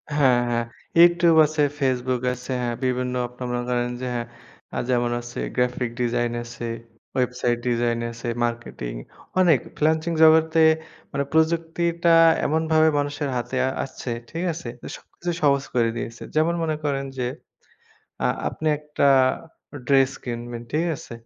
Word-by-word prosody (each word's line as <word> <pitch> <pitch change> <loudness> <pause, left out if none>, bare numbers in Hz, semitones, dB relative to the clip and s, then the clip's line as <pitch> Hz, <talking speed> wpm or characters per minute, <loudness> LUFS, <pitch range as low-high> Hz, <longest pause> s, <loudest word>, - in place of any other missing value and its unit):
হ্যাঁ, 130 -4 +4
হ্যাঁ। 120 0 0 0.3
YouTube 170 -1 +6
আছে, 155 0 -1 0.2
Facebook 130 -2 0
আছে, 125 +1 -8
হ্যাঁ। 120 -1 -1
বিভিন্ন 125 0 -1
আপনারা 125 +1 -7
মনে 120 - -1
করেন 120 0 0
যে - - -3
হ্যাঁ, 120 0 -3 0.5
আ - - -2
যেমন 120 -1 +1
আছে 120 0 -8 0.2
graphic 125 -1 0
design 120 0 0
আছে, 120 0 -8 0.5
website 125 -1 0
design 120 -1 +1
আছে, 115 +1 -8 0.2
marketing 115 - -5 0.4
অনেক 165 -8 +5 0.2
freelancing 160 +2 +1
জগতে 160 +1 +5 0.5
মানে 140 0 -1
প্রযুক্তিটা 170 +1 +1 0.3
এমনভাবে 160 +1 +3
মানুষের 145 0 -2
হাতে 120 +2 -4 0.3
আসছে, 130 -1 -7 0.2
ঠিক 165 +2 -4
আছে? 160 -6 -8 0.3
সবকিছু 175 0 -6
সহজ 140 -1 +3
করে 115 -2 +3
দিয়েছে। 115 0 -6
যেমন 160 +2 +3
মনে 155 -1 0
করেন 140 -2 -1
যে 125 - -1 1.0
আ - - +4 0.2
আপনি 160 - -6
একটা 150 -1 -2 0.8
dress 135 0 +4
কিনবেন, 120 -1 -5
ঠিক 155 +3 +1
আছে? - - -11
130 Hz, 140 wpm, -23 LUFS, 120-160 Hz, 1.0 s, YouTube